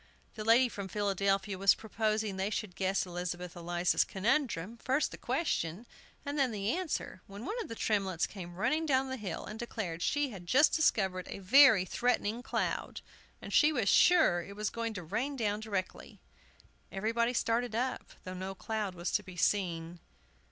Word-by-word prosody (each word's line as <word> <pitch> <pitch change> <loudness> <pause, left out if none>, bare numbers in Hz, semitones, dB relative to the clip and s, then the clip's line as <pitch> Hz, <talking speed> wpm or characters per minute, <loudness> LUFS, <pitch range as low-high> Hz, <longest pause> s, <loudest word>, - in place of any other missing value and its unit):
The 215 - -6
lady 230 +4 +5
from 200 -4 -6
Philadelphia 195 -1 0
was 195 0 +5
proposing 215 -1 -1
they 190 +1 -1
should 210 -4 -4
guess 190 0 0
Elizabeth 175 0 -5
Eliza's 175 +1 +1
conundrum, 225 - -1
first 265 +5 0
the - - -8
question, 195 - -1 0.4
and 285 +1 -3
then 270 -2 +3
the 205 0 -1
answer, 335 - -3
when 200 +4 -9
one - - -3
of - - -6
the 230 - -6
Tremletts 195 -6 0
came 175 -3 -9
running 275 - 0
down 265 -2 +2
the 260 - -3
hill, 200 -7 -5
and 215 +1 -8
declared 200 -8 -4
she 290 +2 0
had 180 -4 -10
just 290 - +5
discovered 190 - +1
a - - -5
very 220 0 +6
threatening 240 +1 0
cloud, - - -2 0.4
and - - -7
she 300 0 +6
was 245 -9 0
sure 320 - +5
it 200 +4 -10
was 210 0 -2
going 230 -1 -3
to 180 - -5
rain 230 - -2
down 210 -4 -1
directly. 200 -4 -5 0.7
Everybody 230 +4 0
started 230 0 0
up, 255 +2 -2
though 185 - -6
no 190 +1 -5
cloud 210 -2 -3
was 175 +1 -3
to 210 - +1
be 185 -3 -12
seen. 170 -3 0
210 Hz, 175 wpm, -32 LUFS, 185-240 Hz, 0.7 s, very